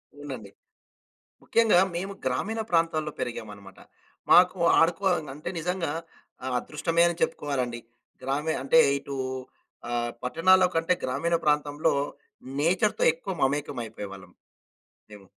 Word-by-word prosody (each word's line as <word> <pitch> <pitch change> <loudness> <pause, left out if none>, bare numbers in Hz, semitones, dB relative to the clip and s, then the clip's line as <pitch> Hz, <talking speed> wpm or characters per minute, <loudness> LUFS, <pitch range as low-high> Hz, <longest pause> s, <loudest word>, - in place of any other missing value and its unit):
అవునండి. 130 -9 -8 0.9
ముఖ్యంగా 225 -6 +4 0.2
మేము 195 +3 -3
గ్రామీణ 220 - -1
ప్రాంతాల్లో 165 -3 +1
పెరిగామనమాట. 100 -4 -7 0.5
మాకు 180 +1 +6 0.2
ఆడుకో 170 +4 +2 0.3
అంటే 155 +4 -5
నిజంగా 175 -2 -2 0.5
ఆహ్, 130 - -2
అదృష్టమే 165 +5 0
అని 170 - -3
చెప్పుకోవాలండి. 125 -5 -1 0.4
గ్రామి 145 +4 -1
అంటే 190 - +4 0.2
ఇటు 140 0 -7 0.7
ఆహ్, 120 0 -1
పట్టణాల్లో 185 +7 +4
కంటే 165 +2 +2
గ్రామీణ 170 +7 0
ప్రాంతంలో 150 0 +1 0.7
నేచర్‌తో 180 +7 +2
ఎక్కువ 170 +4 -6
మమేకం 140 0 0
అయిపోయేవాళ్ళం 100 -4 -9 0.8
మేము. 105 -2 -13
150 Hz, 105 wpm, -27 LUFS, 125-175 Hz, 0.9 s, మాకు